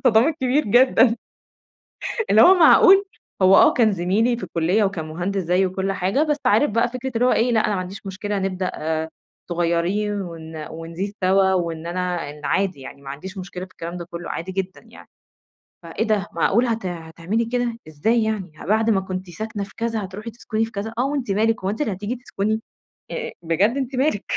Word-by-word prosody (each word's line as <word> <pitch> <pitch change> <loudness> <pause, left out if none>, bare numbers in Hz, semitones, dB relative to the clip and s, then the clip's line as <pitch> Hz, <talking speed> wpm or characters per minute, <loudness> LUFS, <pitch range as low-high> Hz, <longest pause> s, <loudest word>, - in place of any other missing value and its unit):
الصِدام 240 +2 +4
الكبير 285 -1 +1
جدًا. 240 +1 +5 1.1
اللي 220 - +7
هو 375 - +8
معقول؟! 380 +3 +7 0.4
هو 190 +1 +7
آه - - +7
كان 220 -4 +3
زميلي 200 +7 +1
في 235 - -6
الكلية 180 +6 +1
وكان 185 -5 -2
مهندس 185 +4 -2
زيي 180 +3 +2
وكل 190 +1 -2
حاجة، 195 +9 0
بس 300 -2 +1
عارف 290 - +4
بقى 230 +3 +2
فكرة 255 +2 -5
اللي 245 +2 +3
هو - - +4
ايه 240 +2 +2
لأ، 220 -1 +3
أنا 210 - 0
ما 185 - -1
عنديش 195 +2 -8
مشكلة 200 +1 -3
نبدأ 185 -1 -2 0.8
صغيرين 175 +5 0
ون 160 -3 -7
ونزيد 165 +5 -5
سوا، 190 0 +4
وإن 170 -2 -2
أنا 180 +1 -2 0.3
عادي 190 -7 0
يعني 140 +1 -10
ما 135 - -8
عنديش 190 +8 -8
مشكلة 185 -1 -6
في 185 - -16
الكلام 170 +2 -7
ده 170 - -6
كله 170 0 -7
عادي 185 +3 -4
جدًا 190 0 -4
يعني. - - -15 0.8
فإيه 170 +6 -3
ده 205 -2 +1
معقولة 230 +8 +2
هت 225 -4 -3
هتعملي 170 +6 -3
كده! 240 -1 -1
إزاي 220 +10 +1
يعني؟ 205 -6 -2
ما - - -9
بعد 220 +3 +2
ما 195 -3 +3
كنتِ 185 -1 -6
ساكنة 210 +2 -5
في 195 - -12
كذا 230 -2 -2
هتروحي 210 +5 -8
تسكني 225 -1 -2
في 225 - -11
كذا؟ 210 +3 -5
آه 250 - +2
وأنتِ 275 -7 -2
مالِك 220 0 +1
هو 190 - 0
أنتِ 220 +8 -3
اللي 220 - 0
هتيجي 205 +6 -4
تسكني؟ 220 -3 -2 0.5
أ 475 -1 -4
بجد 190 - +1
أنتِ 265 -1 -3
مالك؟! 260 -6 +1
200 Hz, 195 wpm, -22 LUFS, 180-230 Hz, 1.1 s, هو